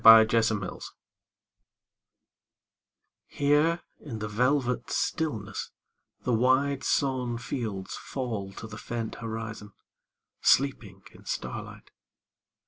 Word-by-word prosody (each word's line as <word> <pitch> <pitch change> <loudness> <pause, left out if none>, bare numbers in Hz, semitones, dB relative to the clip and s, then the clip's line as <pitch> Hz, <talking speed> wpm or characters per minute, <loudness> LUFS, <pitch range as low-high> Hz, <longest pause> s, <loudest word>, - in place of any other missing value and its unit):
THE 115 0 +12
INDIA 110 +1 +4 0.2
WHARF 95 - -6 2.4
HERE 150 +4 +3 0.2
in 125 -7 -6
the 105 0 -3
velvet 125 +3 +1
stillness 110 - -1 0.5
The 125 - +1
wide 130 +4 +3
sown 130 -3 +1
fields 110 -6 -4
fall 110 -7 -4
to - - -8
the 110 -1 -8
faint 115 -2 -4
horizon, 110 -2 -5 0.7
Sleeping 115 -8 +2
in - - -16
starlight. - - -5
115 Hz, 95 wpm, -28 LUFS, 110-135 Hz, 2.4 s, THE